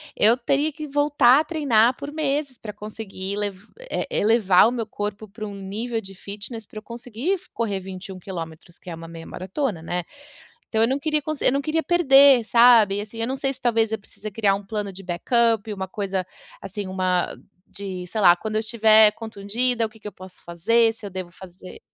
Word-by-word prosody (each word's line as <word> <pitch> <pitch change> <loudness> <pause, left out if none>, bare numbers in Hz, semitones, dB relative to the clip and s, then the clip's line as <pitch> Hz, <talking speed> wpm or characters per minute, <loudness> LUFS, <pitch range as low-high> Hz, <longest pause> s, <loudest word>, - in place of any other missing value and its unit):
eu 225 +3 +5
teria 280 +5 0
que 305 +1 -7
voltar 285 -2 +4
a - - +1
treinar 255 -8 +2
por 285 0 -7
meses 290 -3 -2
para 210 -2 -8
conseguir 205 -2 -6
lev 205 -2 -2 0.2
eh, - - -4
elevar 210 -3 +4
o - - 0
meu 235 -3 -3
corpo 210 0 -5
para 215 +2 -8
um 200 - -8
nível 220 +4 -4
de 195 -1 -11
fitness 210 +3 -8
para 215 - -13
eu - - -18
conseguir 240 - -4
f 380 - -6
correr 205 -4 -2
21 190 0 -9
quilômetros 170 -2 -8
que - - -12
é 165 - -5
uma 165 0 -10
meia 165 0 -10
maratona, 190 - -3
né. 175 +1 -3 0.7
Então 220 -1 +1
eu 230 - +4
não 270 +2 0
queria 305 +1 0
conse 310 0 -4
eu - - +5
não 280 +1 0
queria 320 +2 0
perder, 275 -7 +6
sabe, 230 -4 +5
assim, 215 +2 -9
eu 230 - -1
não 265 - -2
sei 270 0 -1
se 260 - -16
talvez 225 -2 +2
eu 220 - -1
precise 210 +1 -10
criar 200 -1 +2
um 200 - -5
plano 205 -1 -4
de 195 +1 -11
backup, 220 +4 +1
uma 190 -2 -5
coisa, 190 -2 -3 0.3
assim, 200 +1 -6
uma 185 -1 -1 0.3
de, 190 -3 -6
sei 215 +4 -4
lá, 175 -2 +8
quando 215 +4 -6
eu - - +2
estiver 220 -1 +5
contundida, 225 +3 -1
o 215 - -11
que 220 - -19
que 210 - -7
eu - - -10
posso 185 0 -13
fazer, 225 +7 +2
se 225 - -14
eu - - -7
devo 185 -1 -6
fazer 185 +1 -13
215 Hz, 215 wpm, -23 LUFS, 195-245 Hz, 0.7 s, lá